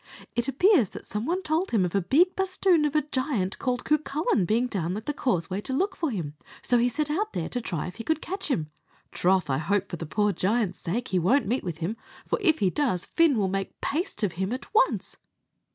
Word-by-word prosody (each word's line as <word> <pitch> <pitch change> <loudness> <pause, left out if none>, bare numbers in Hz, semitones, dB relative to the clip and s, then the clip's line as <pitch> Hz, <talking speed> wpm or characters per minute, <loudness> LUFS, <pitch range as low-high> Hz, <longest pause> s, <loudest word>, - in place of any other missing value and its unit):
It 240 +1 +1
appears 275 - +4
that - - -10
some 210 +3 -4
one 370 +3 0
told 325 +3 0
him 210 -6 +2
of 175 - -3
a 200 - +2
big 320 - +3
basthoon 370 -4 +2
of 295 0 -1
a 305 - +3
giant 260 -9 -2
called 250 -1 -1
Cucullin 300 - +1
being 230 +3 +2
down 190 -6 -2
at 215 - -7
the 295 - -1
Causeway 190 - -1
to 260 - -4
look 380 +9 0
for 325 - -1
him, 170 - -4
and - - -31 0.2
so 245 - +3
he 245 +1 +3
set 295 +4 -2
out 420 +7 -1
there - - -2
to 245 - -3
try 170 -8 -3
if 180 +3 -8
he 230 - -5
could 320 +5 0
catch 385 +4 -4
him. 160 - -1 0.4
Troth, 185 -1 +2
I 135 0 0
hope, 200 +4 0
for 175 - -4
the 165 - -6
poor 210 +5 +1
giant's 200 +2 0
sake, 230 +9 -3
he 185 - +2
won't 235 - +3
meet 240 +6 -1
with 170 -4 -4
him, 180 +7 -3 0.3
for - - -1
if 325 -5 +4
he 190 -3 +2
does, 240 -11 0
Fin 330 -6 +3
will 200 -3 +2
make 195 +1 -3
paste 340 - -2
of 200 - +2
him 190 +5 -3
at 255 +9 -6
once." - - +2
240 Hz, 240 wpm, -27 LUFS, 190-305 Hz, 0.4 s, appears